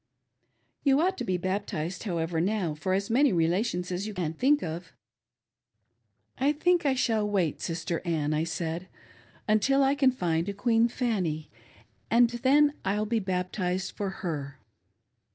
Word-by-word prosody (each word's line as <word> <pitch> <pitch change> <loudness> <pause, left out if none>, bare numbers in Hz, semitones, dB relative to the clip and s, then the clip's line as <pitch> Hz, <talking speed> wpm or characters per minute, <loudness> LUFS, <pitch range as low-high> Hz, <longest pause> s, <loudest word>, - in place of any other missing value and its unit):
You 275 -1 +4
ought 370 +4 +2
to - - -2
be 185 -1 0
bap 190 +3 -2
tized, 170 +6 -4
however, 165 -3 -1
now 190 -3 0
for 175 +5 -2
as 200 +3 -1
many 275 +3 +4
relations 180 +2 0
as 185 +4 -2
you 215 - -6
can 165 -4 -2
think 285 - +2
of." 170 +2 -6 0.7
" - - -63 0.7
I 280 +3 +3
think 345 +1 +2
I 265 - +2
shall 220 -4 +1
wait. 185 -7 0
Sister 165 0 -3
Ann," 155 -4 0
I 155 +1 +1
said, 170 +1 -3 0.3
" - - -28
until 240 +6 +3
I 270 +1 +3
can 280 -2 +4
find 175 -8 -1
a - - -3
Queen 225 +3 +2
Fanny, 190 - -2 0.6
and 235 +1 +5
then 285 +5 +3
I'll 205 +2 0
be 225 +1 0
baptized 185 -1 -2
for 200 -1 -3 0.2
her." 145 -5 -4
190 Hz, 165 wpm, -28 LUFS, 170-240 Hz, 0.7 s, and